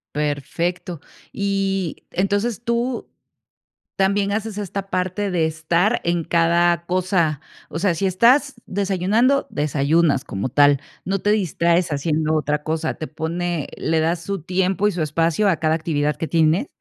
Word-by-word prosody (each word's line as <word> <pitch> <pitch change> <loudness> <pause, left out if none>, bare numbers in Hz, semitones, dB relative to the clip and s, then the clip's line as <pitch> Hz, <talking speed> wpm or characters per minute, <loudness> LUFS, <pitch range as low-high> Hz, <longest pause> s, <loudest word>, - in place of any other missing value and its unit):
Perfecto. 150 +4 -2 0.3
Y 195 -3 -1
entonces, 205 +5 -1
tú 235 +1 -1 0.9
también 200 +1 +1
haces 215 -1 -3
esta 195 -1 -4
parte 185 +2 -1
de 165 -2 +2
estar 170 +7 +1
en 170 0 +1
cada 170 0 +2
cosa. 175 -5 +1 0.3
O 160 - -5
sea, 185 -2 +2
si 195 - 0
estás 250 +10 +4
desayunando, 205 +8 +1
desayunas 145 0 +1
como 100 +5 -3
tal, 145 +1 +4 0.2
no 195 +1 -1
te 205 - +1
distraes 170 -3 +1
haciendo 155 +2 0
otra 150 0 -1
cosa, 160 +1 -2
te 155 - -6
pone 165 0 -3
¿le 160 0 0
das 165 +2 0
su 195 -1 -4
tiempo 190 +3 0
y 210 - -1
su 175 - -2
espacio 165 +6 +1
a 170 - +3
cada 155 0 +1
actividad 150 -2 -1
que 165 - -4
tienes? 165 - +2
175 Hz, 145 wpm, -21 LUFS, 160-195 Hz, 0.9 s, estás